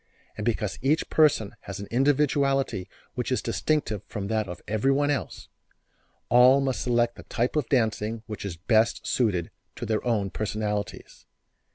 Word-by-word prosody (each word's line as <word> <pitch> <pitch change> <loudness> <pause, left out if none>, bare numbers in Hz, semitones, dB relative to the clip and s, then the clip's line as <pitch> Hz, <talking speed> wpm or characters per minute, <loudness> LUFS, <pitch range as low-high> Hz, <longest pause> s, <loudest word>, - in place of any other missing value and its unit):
And - - -5
because - - -1
each 145 +4 +1
person 145 -10 +3
has 100 - -5
an 100 - -6
individuality 135 -4 +1 0.2
which - - -3
is - - +2
distinctive 145 -10 -1
from 100 -2 -5
that 110 -2 0
of 90 - -8
everyone 135 +7 +2
else, 140 -5 -4 0.8
all 125 +3 +6
must 135 -2 -1
select 120 -1 +1
the - - -10
type 120 +4 -1
of 150 -5 0
dancing 110 -3 0
which 110 -2 -7
is 95 -5 -5
best 110 +6 +2
suited 100 -9 0 0.2
to - - -5
their 110 -1 -1
own 105 -5 0
personalities. 105 0 -4
115 Hz, 155 wpm, -26 LUFS, 105-135 Hz, 0.8 s, all